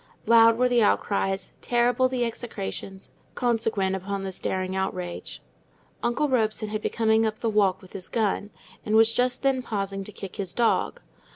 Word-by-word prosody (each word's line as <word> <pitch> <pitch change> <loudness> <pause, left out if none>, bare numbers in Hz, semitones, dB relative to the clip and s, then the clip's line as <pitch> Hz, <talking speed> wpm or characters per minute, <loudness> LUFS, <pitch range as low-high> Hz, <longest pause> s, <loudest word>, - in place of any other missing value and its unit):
Loud 230 0 +6
were 250 +1 +3
the 245 -1 +3
outcries, 195 -2 0
terrible 245 +1 +2
the 250 -2 0
execrations, 200 -4 -6 0.2
consequent 225 -5 0
upon 195 +1 -4
this 190 -1 -5
daring 185 0 -2
outrage; 185 -2 -4 0.6
uncle 245 +6 +1
Robson 220 -4 0
had 215 0 -3
been - - -2
coming 220 -1 +2
up 220 -1 -1
the 225 0 -1
walk 195 -3 +2
with 185 - -15
his 185 -1 -8
gun, 210 -2 0 0.3
and 215 - 0
was 225 +1 +5
just 250 +2 0
then 270 -1 +2
pausing 195 -4 -3
to 210 - -9
kick 195 -2 -9
his 190 -3 -4
dog. 235 -1 +1
215 Hz, 170 wpm, -26 LUFS, 195-235 Hz, 0.6 s, Loud